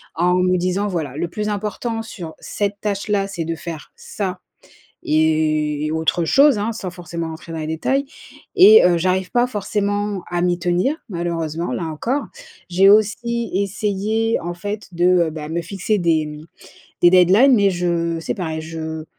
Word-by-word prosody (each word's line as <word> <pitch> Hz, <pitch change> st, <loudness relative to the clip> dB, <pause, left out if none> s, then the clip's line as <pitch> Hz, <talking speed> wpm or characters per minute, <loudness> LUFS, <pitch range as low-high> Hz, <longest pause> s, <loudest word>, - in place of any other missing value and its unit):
en 175 Hz, +2 st, +2 dB
me 180 Hz, 0 st, +2 dB
disant: 185 Hz, +3 st, -1 dB
«Voilà, 155 Hz, -8 st, -3 dB
le 170 Hz, +3 st, -2 dB
plus 210 Hz, +4 st, -4 dB
important 215 Hz, +3 st, -3 dB
sur 175 Hz, -7 st, -8 dB
cette 205 Hz, -1 st, -3 dB
tâche 200 Hz, 0 st, -2 dB
là, 200 Hz, -1 st, +1 dB
c'est 175 Hz, -5 st, -4 dB
de 165 Hz, -, -2 dB
faire 160 Hz, -2 st, -8 dB
ça 185 Hz, -3 st, -5 dB, 0.6 s
et 155 Hz, -1 st, +1 dB
autre 160 Hz, +2 st, 0 dB
chose», 275 Hz, -, +5 dB
hein. 215 Hz, +3 st, -1 dB
Sans 200 Hz, -5 st, -5 dB
forcément 170 Hz, -2 st, -6 dB
rentrer 160 Hz, +1 st, -9 dB
dans 165 Hz, -, -5 dB
les 155 Hz, -, -4 dB
détails 265 Hz, -, -1 dB, 0.5 s
et 415 Hz, +4 st, +8 dB
heu, 175 Hz, -1 st, +4 dB
j'arrive 185 Hz, +2 st, 0 dB
pas 245 Hz, 0 st, +2 dB
forcément 205 Hz, -3 st, -2 dB
à 175 Hz, 0 st, -1 dB
m'y 175 Hz, 0 st, +1 dB
tenir 180 Hz, -, +1 dB
malheureusement 170 Hz, -2 st, -3 dB
là 175 Hz, -, -3 dB
encore. 235 Hz, -, -2 dB, 0.4 s
J'ai 190 Hz, +2 st, +5 dB
aussi 230 Hz, +3 st, +2 dB
essayé 210 Hz, +3 st, 0 dB
en 175 Hz, +1 st, -4 dB
fait 205 Hz, +4 st, -6 dB
de, 175 Hz, +1 st, +1 dB, 0.2 s
heu, -, -, -2 dB
bah 150 Hz, -1 st, -7 dB
me 170 Hz, +1 st, -2 dB
fixer 195 Hz, +4 st, -2 dB
des, 165 Hz, -4 st, +1 dB
mmh 150 Hz, 0 st, -8 dB, 0.6 s
de 175 Hz, -, +8 dB
deadlines, 190 Hz, +9 st, +6 dB
mais 200 Hz, -3 st, +4 dB
je 170 Hz, -2 st, -1 dB
c'est 160 Hz, -, -3 dB
pareil, 160 Hz, -5 st, -4 dB
je 160 Hz, 0 st, -6 dB
180 Hz, 170 wpm, -20 LUFS, 165-205 Hz, 0.6 s, et